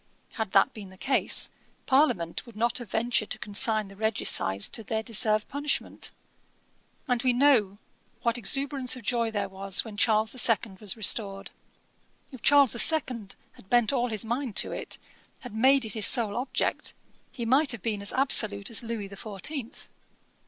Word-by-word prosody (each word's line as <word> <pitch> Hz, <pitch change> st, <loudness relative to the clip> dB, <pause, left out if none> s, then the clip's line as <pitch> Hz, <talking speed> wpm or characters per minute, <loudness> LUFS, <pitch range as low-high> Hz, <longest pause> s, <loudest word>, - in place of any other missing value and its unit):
Had 220 Hz, -4 st, -5 dB
that 195 Hz, -, +4 dB
been 205 Hz, -3 st, -10 dB
the 190 Hz, -, -16 dB
case, 265 Hz, +7 st, +1 dB, 0.3 s
Parliament 260 Hz, -, +1 dB
would 235 Hz, -, -14 dB
not 235 Hz, +3 st, 0 dB
have 240 Hz, -4 st, -10 dB
ventured 225 Hz, 0 st, -1 dB
to -, -, -5 dB
consign 215 Hz, +1 st, -1 dB
the 195 Hz, -, -14 dB
regicides 205 Hz, -, +1 dB
to -, -, -3 dB
their 220 Hz, +1 st, -3 dB
deserved 215 Hz, -2 st, +2 dB
punishment. 290 Hz, +1 st, -4 dB, 1.0 s
And 245 Hz, -2 st, 0 dB
we 255 Hz, -1 st, +2 dB
know 240 Hz, -7 st, +3 dB, 0.5 s
what 235 Hz, -1 st, +1 dB
exuberance 265 Hz, +4 st, +2 dB
of 250 Hz, -, -11 dB
joy 230 Hz, +1 st, 0 dB
there 210 Hz, -2 st, -3 dB
was 195 Hz, +1 st, -1 dB
when 215 Hz, -2 st, -10 dB
Charles 220 Hz, 0 st, +2 dB
the 255 Hz, -, -4 dB
Second 215 Hz, -5 st, +2 dB
was 210 Hz, 0 st, -3 dB
restored. 200 Hz, -2 st, 0 dB, 0.8 s
If 260 Hz, -4 st, -12 dB
Charles 280 Hz, -3 st, +5 dB
the 235 Hz, -, -5 dB
Second 250 Hz, -10 st, +1 dB, 0.2 s
had 190 Hz, -, -20 dB
bent 240 Hz, 0 st, +2 dB
all 245 Hz, -2 st, 0 dB
his 220 Hz, 0 st, -1 dB
mind 240 Hz, -1 st, -3 dB
to -, -, +2 dB
it, -, -, -4 dB, 0.4 s
had 245 Hz, -4 st, -10 dB
made 260 Hz, +3 st, +4 dB
it 215 Hz, -, -7 dB
his 215 Hz, -2 st, +3 dB
sole 225 Hz, -5 st, +3 dB
object, 255 Hz, +2 st, -2 dB, 0.4 s
he 235 Hz, -, -6 dB
might 270 Hz, +5 st, +2 dB
have 235 Hz, -6 st, -4 dB
been 210 Hz, -3 st, -3 dB
as 200 Hz, -, -2 dB
absolute 215 Hz, -6 st, +4 dB
as 230 Hz, -, 0 dB
Louis 225 Hz, -3 st, -5 dB
the 200 Hz, -, -11 dB
Fourteenth.' 230 Hz, -, -6 dB
225 Hz, 175 wpm, -27 LUFS, 205-250 Hz, 1.0 s, Charles